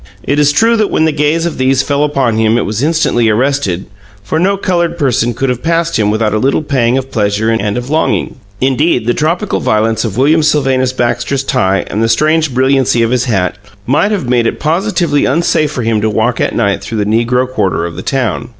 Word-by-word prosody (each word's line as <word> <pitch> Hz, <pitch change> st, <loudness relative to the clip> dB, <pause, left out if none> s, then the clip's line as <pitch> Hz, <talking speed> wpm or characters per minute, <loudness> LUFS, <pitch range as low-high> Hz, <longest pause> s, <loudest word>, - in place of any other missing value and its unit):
It 145 Hz, +2 st, 0 dB
is 145 Hz, -1 st, +4 dB
true 225 Hz, +10 st, +2 dB
that 215 Hz, -2 st, +1 dB
when 160 Hz, -, +1 dB
the 160 Hz, -, +2 dB
gaze 150 Hz, +3 st, 0 dB
of 170 Hz, -, -4 dB
these 130 Hz, +1 st, +2 dB
fell 145 Hz, +1 st, 0 dB
upon 135 Hz, -6 st, 0 dB
him 110 Hz, +1 st, +2 dB
it -, -, -1 dB
was 110 Hz, +3 st, -3 dB
instantly 150 Hz, -7 st, +1 dB
arrested, 110 Hz, -6 st, 0 dB, 0.4 s
for 155 Hz, +10 st, -2 dB
no 195 Hz, +3 st, +1 dB
colored 170 Hz, -3 st, -1 dB
person 120 Hz, -4 st, 0 dB
could 135 Hz, +2 st, -1 dB
have 125 Hz, -1 st, -2 dB
passed 165 Hz, -3 st, 0 dB
him 105 Hz, -1 st, +1 dB
without 110 Hz, 0 st, 0 dB
a 110 Hz, -, +1 dB
little 135 Hz, +5 st, 0 dB
pang 130 Hz, -4 st, +1 dB
of 135 Hz, 0 st, -4 dB
pleasure 105 Hz, +1 st, 0 dB
and 105 Hz, -1 st, -1 dB
of 125 Hz, +3 st, -5 dB
longing. 160 Hz, +1 st, 0 dB, 0.3 s
Indeed, 135 Hz, -1 st, +1 dB
the 120 Hz, -, +1 dB
tropical 170 Hz, +8 st, -1 dB
violence 110 Hz, +1 st, 0 dB
of 110 Hz, -3 st, -4 dB
William 150 Hz, +5 st, +3 dB
Sylvanus 135 Hz, -4 st, +1 dB
Baxter's 120 Hz, +2 st, -1 dB
tie 95 Hz, -6 st, 0 dB
and 105 Hz, -, -3 dB
the 115 Hz, -, +1 dB
strange 155 Hz, +3 st, +2 dB
brilliancy 130 Hz, -1 st, +2 dB
of 115 Hz, -, 0 dB
his 125 Hz, -1 st, +1 dB
hat 95 Hz, -5 st, -1 dB, 0.3 s
might 145 Hz, -, +1 dB
have 200 Hz, -11 st, -2 dB
made 120 Hz, -2 st, +2 dB
it -, -, -3 dB
positively 170 Hz, -1 st, 0 dB
unsafe 155 Hz, +1 st, +1 dB
for 125 Hz, -, -4 dB
him 110 Hz, -1 st, 0 dB
to 110 Hz, -, +1 dB
walk 110 Hz, +3 st, 0 dB
at -, -, -1 dB
night 100 Hz, -1 st, 0 dB
through 115 Hz, -, -5 dB
the 105 Hz, -, 0 dB
negro 120 Hz, +4 st, +1 dB
quarter 100 Hz, -9 st, -1 dB
of 85 Hz, -1 st, -6 dB
the -, -, -6 dB
town. 120 Hz, -3 st, -2 dB
130 Hz, 220 wpm, -13 LUFS, 115-150 Hz, 0.4 s, is